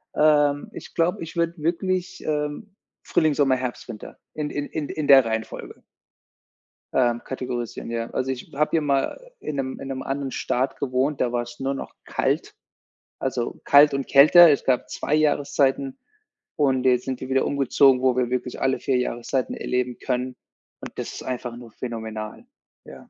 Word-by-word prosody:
ähm, 145 Hz, -1 st, +3 dB
ich -, -, -10 dB
glaube, 170 Hz, +2 st, 0 dB
ich 165 Hz, -, -9 dB
würde 170 Hz, 0 st, +1 dB
wirklich, 180 Hz, +3 st, -2 dB
ähm, 150 Hz, +7 st, -3 dB, 0.3 s
Frühling, 155 Hz, -2 st, +2 dB
Sommer, 140 Hz, -2 st, +3 dB
Herbst, 125 Hz, -1 st, -5 dB
Winter 110 Hz, -3 st, -9 dB, 0.2 s
in 150 Hz, -1 st, -3 dB
in 145 Hz, 0 st, -3 dB
in 150 Hz, -3 st, -4 dB
in 155 Hz, -2 st, -3 dB
der 135 Hz, -3 st, +8 dB
Reihenfolge 110 Hz, 0 st, -5 dB, 1.1 s
ähm, 120 Hz, -2 st, +2 dB
kategorisieren. 125 Hz, -3 st, -5 dB
Ja. 115 Hz, 0 st, -3 dB
Also, 130 Hz, +1 st, -1 dB
ich 125 Hz, -2 st, -7 dB
habe 150 Hz, +2 st, +1 dB
hier 165 Hz, -, +2 dB
mal 145 Hz, -, -1 dB
in 150 Hz, -, -5 dB
'nem 130 Hz, -1 st, -3 dB
in 135 Hz, -, -7 dB
'nem 130 Hz, -1 st, -4 dB
anderen 135 Hz, 0 st, -3 dB
Staat 130 Hz, +2 st, -1 dB
gewohnt, 135 Hz, +2 st, 0 dB
da 120 Hz, -, +1 dB
war's 120 Hz, 0 st, -4 dB
nur 135 Hz, +1 st, -1 dB
noch -, -, -7 dB
kalt, -, -, -1 dB, 0.7 s
also, 125 Hz, -3 st, -3 dB
kalt 145 Hz, 0 st, +6 dB
und 140 Hz, -1 st, -2 dB
kälter. 155 Hz, +5 st, +8 dB
Es 140 Hz, -, +1 dB
gab 125 Hz, -5 st, +1 dB
2 145 Hz, -, -2 dB
Jahreszeiten 150 Hz, -, +1 dB, 0.6 s
und 135 Hz, -4 st, +2 dB
jetzt 125 Hz, -1 st, +3 dB
sind 130 Hz, -2 st, -3 dB
wir 130 Hz, -, -6 dB
wieder 135 Hz, 0 st, +2 dB
umgezogen, 135 Hz, -1 st, +4 dB
wo 130 Hz, -2 st, +3 dB
wir 125 Hz, -1 st, +1 dB
wirklich 125 Hz, 0 st, -3 dB
alle 135 Hz, 0 st, +1 dB
4 130 Hz, -2 st, 0 dB
Jahreszeiten 125 Hz, +1 st, -2 dB
erleben 125 Hz, -1 st, -2 dB
können, 125 Hz, 0 st, -2 dB, 0.5 s
und -, -, -7 dB
das -, -, -5 dB
ist -, -, -8 dB
einfach 125 Hz, -2 st, -4 dB
nur 120 Hz, -2 st, -12 dB
phänomenal. 110 Hz, -, -6 dB, 0.4 s
Ja. -, -, -13 dB
135 Hz, 170 wpm, -24 LUFS, 125-150 Hz, 1.1 s, der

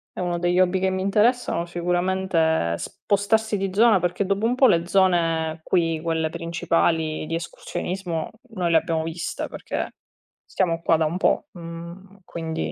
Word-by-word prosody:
Eh, -, -, -4 dB
uno 175 Hz, -1 st, -1 dB
degli 175 Hz, +1 st, +1 dB
hobby 185 Hz, 0 st, +3 dB
che 190 Hz, 0 st, +1 dB
mi 190 Hz, 0 st, -2 dB
interessano 210 Hz, -2 st, +2 dB
sicuramente 180 Hz, +1 st, -1 dB
è 160 Hz, -, +2 dB
spostarsi 210 Hz, +1 st, 0 dB
di 195 Hz, -1 st, -2 dB
zona 220 Hz, -2 st, +5 dB
perché 180 Hz, +3 st, -1 dB
dopo 200 Hz, +3 st, 0 dB
un 240 Hz, -, +2 dB
po' 260 Hz, 0 st, +5 dB
le 170 Hz, -3 st, +3 dB
zone 165 Hz, -4 st, +2 dB
qui, 165 Hz, -3 st, +1 dB
quelle 160 Hz, -1 st, 0 dB
principali 165 Hz, -1 st, 0 dB
di 165 Hz, -, -5 dB
escursionismo, 170 Hz, 0 st, -4 dB, 0.2 s
noi 185 Hz, -6 st, -2 dB
le 165 Hz, -, +6 dB
abbiamo 160 Hz, 0 st, 0 dB
viste 165 Hz, +1 st, -4 dB
perché -, -, -5 dB, 0.5 s
stiamo 170 Hz, -3 st, -1 dB
qua 165 Hz, -, +4 dB
da 160 Hz, -, +1 dB
un 170 Hz, +4 st, -1 dB
po'; 290 Hz, -, +1 dB
mhmm, 170 Hz, +3 st, -10 dB
quindi 160 Hz, -1 st, -4 dB
175 Hz, 165 wpm, -24 LUFS, 165-190 Hz, 0.5 s, le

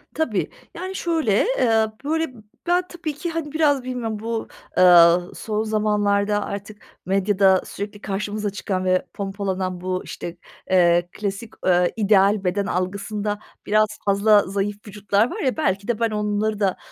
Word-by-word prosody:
Tabii. 245 Hz, -11 st, -1 dB, 0.2 s
Yani, 375 Hz, +3 st, -6 dB
şöyle, 320 Hz, -, +1 dB
eee, 225 Hz, -2 st, +3 dB, 0.2 s
böyle, 320 Hz, -2 st, -1 dB, 0.3 s
ben 355 Hz, +1 st, +3 dB
tabii 325 Hz, -4 st, -5 dB
ki, 305 Hz, +4 st, -4 dB
hani, 325 Hz, -3 st, -4 dB
biraz 290 Hz, -4 st, +2 dB
bilmiyorum 235 Hz, -4 st, -4 dB
bu, 225 Hz, 0 st, -3 dB, 0.3 s
ııı, 175 Hz, -1 st, +6 dB
son 215 Hz, 0 st, -2 dB
zamanlarda 210 Hz, -1 st, +1 dB
artık 205 Hz, +1 st, -7 dB, 0.2 s
medyada 195 Hz, 0 st, +3 dB
sürekli 205 Hz, +1 st, -7 dB
karşımıza 205 Hz, +1 st, -3 dB
çıkan 190 Hz, -2 st, -3 dB
ve 185 Hz, 0 st, +2 dB
pompalanan 190 Hz, -2 st, -3 dB
bu, 185 Hz, 0 st, -2 dB
işte, 170 Hz, 0 st, -7 dB, 0.3 s
eee, 175 Hz, -1 st, +4 dB
klasik, 205 Hz, +2 st, -5 dB
eee, 180 Hz, -1 st, +3 dB
ideal 205 Hz, -1 st, +3 dB
beden 195 Hz, +2 st, 0 dB
algısında 200 Hz, +3 st, -2 dB, 0.3 s
biraz 215 Hz, +1 st, +3 dB, 0.2 s
fazla 205 Hz, +1 st, +4 dB
zayıf 200 Hz, +1 st, -2 dB
vücutlar 205 Hz, +3 st, +1 dB
var -, -, -5 dB
ya 260 Hz, +3 st, 0 dB
belki 200 Hz, -8 st, 0 dB
de 235 Hz, -2 st, -1 dB
ben 230 Hz, -1 st, +1 dB
onları 210 Hz, 0 st, -1 dB
da, 195 Hz, -2 st, +1 dB
205 Hz, 145 wpm, -22 LUFS, 195-225 Hz, 0.3 s, ııı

